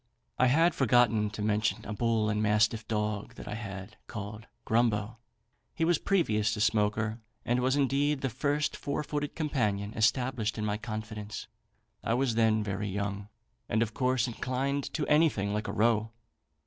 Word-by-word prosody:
"I 130 Hz, -, +5 dB
had 165 Hz, +7 st, +4 dB
forgotten 120 Hz, -4 st, +3 dB
to 105 Hz, 0 st, -5 dB
mention 105 Hz, 0 st, 0 dB
a 105 Hz, -, -4 dB
bull 115 Hz, 0 st, +1 dB
and 105 Hz, 0 st, 0 dB
mastiff 110 Hz, +1 st, +2 dB
dog 105 Hz, -2 st, -2 dB
that -, -, -10 dB
I 105 Hz, -, -4 dB
had, 100 Hz, -1 st, -7 dB
called 105 Hz, 0 st, -7 dB, 0.2 s
Grumbo. 110 Hz, -1 st, +1 dB, 0.6 s
He 165 Hz, -, +1 dB
was 170 Hz, -1 st, +3 dB
previous 110 Hz, -, +1 dB
to -, -, -5 dB
Smoaker, 110 Hz, +1 st, +1 dB, 0.3 s
and 120 Hz, +1 st, +1 dB
was 130 Hz, +2 st, +2 dB
indeed 140 Hz, +1 st, +1 dB
the 135 Hz, -, 0 dB
first 145 Hz, +5 st, 0 dB
four 140 Hz, +1 st, -3 dB
footed 145 Hz, 0 st, -3 dB
companion 105 Hz, -10 st, -1 dB
established 115 Hz, 0 st, +1 dB
in 105 Hz, -, -2 dB
my 105 Hz, 0 st, 0 dB
confidence. 110 Hz, -1 st, -6 dB, 0.6 s
I 115 Hz, -, +1 dB
was 130 Hz, -2 st, +1 dB
then 110 Hz, -1 st, +3 dB
very 100 Hz, 0 st, -3 dB
young, 100 Hz, +1 st, -3 dB, 0.4 s
and 110 Hz, +1 st, +2 dB
of 110 Hz, -2 st, -5 dB
course 130 Hz, 0 st, +1 dB
inclined 130 Hz, +4 st, -2 dB
to 155 Hz, -, 0 dB
anything 150 Hz, -10 st, +3 dB
like 105 Hz, 0 st, -2 dB
a -, -, -2 dB
row. 110 Hz, 0 st, +2 dB
110 Hz, 165 wpm, -30 LUFS, 105-130 Hz, 0.6 s, I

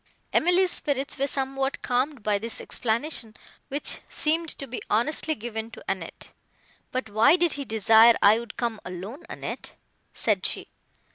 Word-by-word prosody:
Emily's 360 Hz, +2 st, +4 dB
spirits 280 Hz, -1 st, -1 dB
were 275 Hz, -, +1 dB
somewhat 270 Hz, 0 st, -1 dB
calmed 255 Hz, 0 st, 0 dB
by 210 Hz, -1 st, +1 dB
this 230 Hz, +2 st, -5 dB
explanation, 230 Hz, -1 st, -2 dB, 0.3 s
which 285 Hz, +1 st, +2 dB
seemed 320 Hz, +2 st, 0 dB
to 275 Hz, -, -5 dB
be 250 Hz, -2 st, -6 dB
honestly 305 Hz, +8 st, +1 dB
given 225 Hz, -2 st, -5 dB
to 230 Hz, -, -12 dB
Annette. 190 Hz, -4 st, -4 dB, 0.6 s
"But 255 Hz, -3 st, -2 dB
why 220 Hz, +9 st, +6 dB
did 345 Hz, -2 st, +2 dB
he 280 Hz, -1 st, -4 dB
desire 225 Hz, +1 st, +6 dB
I 210 Hz, +3 st, +6 dB
would 235 Hz, -2 st, -9 dB
come 235 Hz, -3 st, -2 dB
alone, 190 Hz, -, -7 dB
Annette?" -, -, -3 dB, 0.4 s
said -, -, 0 dB
she. -, -, -3 dB
245 Hz, 150 wpm, -26 LUFS, 220-285 Hz, 0.6 s, why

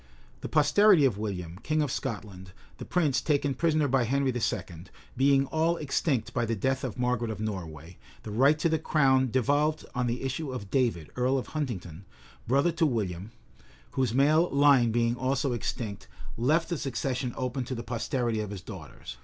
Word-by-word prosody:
The -, -, -6 dB
posterity 160 Hz, +2 st, +5 dB
of 110 Hz, -7 st, +1 dB
William, 90 Hz, -5 st, -5 dB
king 155 Hz, +3 st, 0 dB
of 145 Hz, -, -2 dB
Scotland, 100 Hz, -8 st, -5 dB, 0.3 s
the -, -, -6 dB
prince 150 Hz, -8 st, +1 dB
taken 145 Hz, -2 st, +1 dB
prisoner 155 Hz, +1 st, +1 dB
by 130 Hz, -2 st, +2 dB
Henry 135 Hz, +2 st, +1 dB
II., 90 Hz, -7 st, -3 dB, 0.3 s
being 135 Hz, +1 st, +3 dB
all 160 Hz, +4 st, 0 dB
extinct 140 Hz, -4 st, -1 dB
by 120 Hz, -, 0 dB
the 115 Hz, 0 st, -1 dB
death 130 Hz, +6 st, -1 dB
of 130 Hz, -2 st, -4 dB
Margaret 125 Hz, -2 st, 0 dB
of 110 Hz, -, -5 dB
Norway, 85 Hz, -6 st, -6 dB, 0.3 s
the 105 Hz, -, -7 dB
right 135 Hz, +8 st, +4 dB
to 160 Hz, -, +1 dB
the 160 Hz, -1 st, +1 dB
crown 130 Hz, -4 st, +3 dB
devolved 145 Hz, +5 st, +1 dB
on 125 Hz, -1 st, -1 dB
the 120 Hz, +2 st, -2 dB
issue 135 Hz, +2 st, -3 dB
of 105 Hz, -6 st, -7 dB
David, 115 Hz, -, 0 dB
earl 125 Hz, +2 st, +1 dB
of 130 Hz, -, -4 dB
Huntingdon 100 Hz, -, -5 dB, 0.4 s
brother 140 Hz, +8 st, +3 dB
to 165 Hz, 0 st, +1 dB
William, 100 Hz, -, -3 dB, 0.6 s
whose 130 Hz, -4 st, 0 dB
male 150 Hz, +7 st, +3 dB
line 140 Hz, -4 st, +4 dB
being 115 Hz, +1 st, +1 dB
also 130 Hz, +1 st, 0 dB
extinct, 110 Hz, -4 st, -4 dB, 0.3 s
left 155 Hz, +8 st, +1 dB
the 170 Hz, -4 st, -2 dB
succession 130 Hz, -1 st, -2 dB
open 130 Hz, 0 st, -2 dB
to 130 Hz, -, -4 dB
the 115 Hz, -, -5 dB
posterity 120 Hz, 0 st, -2 dB
of 105 Hz, -2 st, -3 dB
his 100 Hz, -3 st, -7 dB
daughters. 65 Hz, -, -10 dB
130 Hz, 180 wpm, -28 LUFS, 110-145 Hz, 0.6 s, posterity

